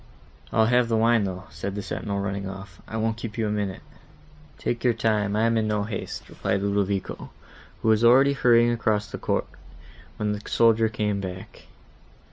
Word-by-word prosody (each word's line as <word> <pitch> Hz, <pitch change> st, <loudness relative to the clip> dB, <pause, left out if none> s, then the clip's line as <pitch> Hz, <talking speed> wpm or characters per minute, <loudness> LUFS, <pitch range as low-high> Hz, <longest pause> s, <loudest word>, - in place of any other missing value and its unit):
"I'll 110 Hz, -, +4 dB
have 120 Hz, 0 st, +3 dB
the 115 Hz, -, +2 dB
wine, 115 Hz, -1 st, +3 dB
though," 90 Hz, -1 st, -5 dB
said 100 Hz, 0 st, -5 dB
the 100 Hz, -, -4 dB
sentinel, 100 Hz, +1 st, -3 dB
running 100 Hz, -1 st, -3 dB
off. 95 Hz, 0 st, -10 dB
"I 110 Hz, -, -5 dB
won't 110 Hz, 0 st, 0 dB
keep 115 Hz, -1 st, -7 dB
you 110 Hz, -2 st, 0 dB
a -, -, -1 dB
minute." 100 Hz, -2 st, -3 dB, 0.7 s
"Take 120 Hz, -1 st, -3 dB
your 120 Hz, -2 st, +3 dB
time, 105 Hz, -3 st, +1 dB
I 110 Hz, -, +2 dB
am 115 Hz, 0 st, +2 dB
in 110 Hz, -, 0 dB
no 105 Hz, -1 st, 0 dB
haste," 100 Hz, -1 st, -6 dB
replied 100 Hz, 0 st, -2 dB
Ludovico, 100 Hz, -1 st, -1 dB, 0.5 s
who 110 Hz, -, +2 dB
was 110 Hz, +1 st, +4 dB
already 135 Hz, +4 st, +6 dB
hurrying 120 Hz, -3 st, +4 dB
across 110 Hz, -3 st, 0 dB
the -, -, -6 dB
court, -, -, 0 dB, 0.7 s
when 105 Hz, -1 st, -1 dB
the 105 Hz, 0 st, -4 dB
soldier 115 Hz, -1 st, +4 dB
came 105 Hz, -2 st, -1 dB
back. 95 Hz, -1 st, -8 dB
105 Hz, 185 wpm, -25 LUFS, 100-115 Hz, 0.7 s, already